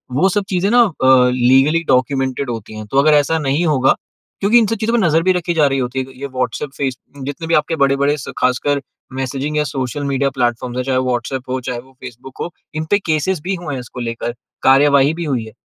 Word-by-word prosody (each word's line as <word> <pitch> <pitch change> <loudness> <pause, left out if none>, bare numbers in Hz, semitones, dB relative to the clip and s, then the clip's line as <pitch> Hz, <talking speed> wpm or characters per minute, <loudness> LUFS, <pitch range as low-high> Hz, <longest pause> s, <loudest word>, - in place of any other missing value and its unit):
वो 185 +8 +3
सब 200 +2 0
चीज़ें 190 +1 +1
ना 245 0 +6
अ, 130 - +4
लीगली 135 +6 +3
डॉक्यूमेंटेड 130 +1 0
होती 110 -2 -6
हैं। 110 - -7
तो 135 - 0
अगर 155 +2 +5
ऐसा 150 +2 +3
नहीं 145 +3 0
होगा 135 -5 +3 0.4
क्योंकि 210 +4 +4
इन 225 - +3
सब 225 - -1
चीज़ों 230 +1 -1
पर - - +3
नज़र 165 0 +3
भी 185 - +3
रखी 175 -1 -1
जा 155 -3 +3
रही 135 - 0
होती 130 +1 -2
है। 130 0 -5
ये 140 - -4
व्हाट्सएप, 130 +1 -3
फेसबुक, 135 0 -5
जितने 145 +4 -5
भी 165 - 0
आपके 155 +2 +1
बड़े-बड़े, 140 +1 +2 0.2
ख़ासकर 140 +3 +1 0.3
मैसेजिंग 135 +3 -3
या 150 - +2
सोशल 135 -1 -4
मीडिया 140 0 0
प्लेटफ़ॉर्म्स 120 -1 -2
हैं, 125 - 0
चाहे 130 -1 0
वो 130 - 0
व्हाट्सएप 125 +1 -3
हो, 130 0 -1
चाहे 125 -1 -2
वो 130 +2 -15
फ़ेसबुक 130 +3 -11
हो, - - -3 0.3
इन 155 0 -2
पर 205 - +5
केसेस 160 +3 0
भी 190 +1 -1
हुए 170 -5 -6
हैं 130 - -3
इसको 125 0 -10
लेकर, 115 0 -3 0.3
कार्रवाई 140 +1 +5
भी 170 +1 -4
हुई 125 -7 -1
है। 110 - -12
140 Hz, 230 wpm, -18 LUFS, 130-155 Hz, 0.4 s, ना